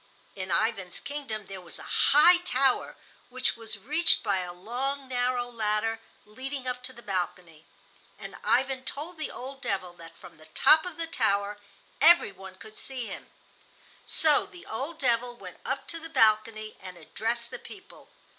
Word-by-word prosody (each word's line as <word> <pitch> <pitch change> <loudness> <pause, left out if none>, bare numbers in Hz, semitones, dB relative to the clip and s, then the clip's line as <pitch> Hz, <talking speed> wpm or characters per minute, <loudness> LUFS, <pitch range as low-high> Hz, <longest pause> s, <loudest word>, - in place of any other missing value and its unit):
In 185 -1 -5
Ivan's 195 0 0
kingdom 270 -8 -5
there 195 -1 -8
was 175 - -10
a - - -10
high 340 +5 +6
tower, 270 -7 +1 0.3
which 255 0 0
was 225 -2 -7
reached 305 - +3
by 200 -4 +1
a 180 -1 -4
long, 255 +9 -3
narrow 245 -1 0
ladder 225 -1 -1 0.3
leading 260 +5 -6
up 250 0 -3
to 260 - -5
the 235 -2 -14
balcony, 180 -4 -4 0.5
and - - -9
Ivan 265 0 +2
told 310 +6 -6
the 310 - -2
old 270 +2 -8
devil 185 -7 -2
that 165 0 -13
from - - -14
the 155 0 -16
top 315 +3 +7
of 345 -3 -8
the 330 - -2
tower 205 -8 0 0.4
every 340 -9 +7
one 190 0 -11
could 215 +2 -12
see 260 -3 -3
him. - - -8 0.8
So 305 -2 +3
the 355 - -14
old 275 +9 -5
devil 245 -2 +1
went 185 -5 -10
up 270 0 -2
to 335 - -4
the 325 0 -9
balcony 215 -4 +2
and 185 -1 -9
addressed 230 +8 -2
the - - -6
people. 390 -1 -14
235 Hz, 170 wpm, -28 LUFS, 200-275 Hz, 0.8 s, top